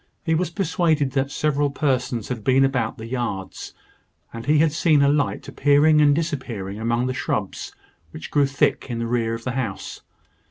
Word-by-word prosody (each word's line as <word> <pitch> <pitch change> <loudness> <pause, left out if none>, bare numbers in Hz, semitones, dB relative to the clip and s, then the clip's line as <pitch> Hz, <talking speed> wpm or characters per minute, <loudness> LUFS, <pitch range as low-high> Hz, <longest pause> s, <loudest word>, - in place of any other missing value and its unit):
He 160 - 0
was 165 +1 0
persuaded 165 -5 0
that 135 0 0
several 145 0 0
persons 125 -5 -1
had 120 -4 -4
been 135 +2 +4
about 125 -4 -1
the 110 - -8
yards; 115 -6 -5 0.6
and 115 +2 -8
he 150 +1 +4
had 155 +1 +3
seen 155 -2 +3
a - - +4
light 145 0 0
appearing 150 +2 +4
and 145 -1 +5
disappearing 125 - -4
among 120 +2 0
the 130 - -1
shrubs - - -3 0.3
which 80 - -9
grew 145 -2 +3
thick 135 0 0
in 120 - -3
the 115 - -2
rear 115 -1 0
of 115 - -9
the 125 - -2
house. 120 -7 -4
135 Hz, 185 wpm, -22 LUFS, 115-150 Hz, 0.6 s, and